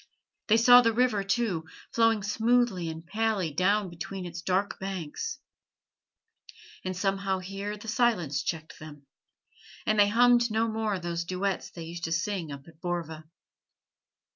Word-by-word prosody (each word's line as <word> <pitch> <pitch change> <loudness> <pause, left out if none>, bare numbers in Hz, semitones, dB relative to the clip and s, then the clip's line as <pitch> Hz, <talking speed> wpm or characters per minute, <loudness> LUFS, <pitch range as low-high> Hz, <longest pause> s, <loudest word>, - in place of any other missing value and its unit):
They 220 - +5
saw 245 +2 +8
the 230 -2 +2
river, 240 -5 +2
too, 195 -5 0 0.3
flowing 225 -2 +3
smoothly 220 -4 +1
and 160 +1 -7
palely 210 -3 0
down 195 +6 +2
between 180 +2 -6
its 170 -1 -6
dark 190 +3 -1
banks; 195 - -4 1.5
and 185 -1 -3
somehow 195 0 0
here 195 +3 -5
the 210 - -11
silence 210 - +1
checked 160 -2 -5
them, 150 -2 -11 0.8
and 215 0 +2
they 205 - +7
hummed 240 +1 +5
no 220 +1 +1
more 220 -2 -1
those 170 -1 -3
duets 185 +2 -2
they 170 - -9
used 170 +1 -6
to 165 - -4
sing 170 -1 -2
up 140 +1 -9
at 160 -1 -17
Borva. 165 -3 -4
195 Hz, 145 wpm, -28 LUFS, 170-220 Hz, 1.5 s, saw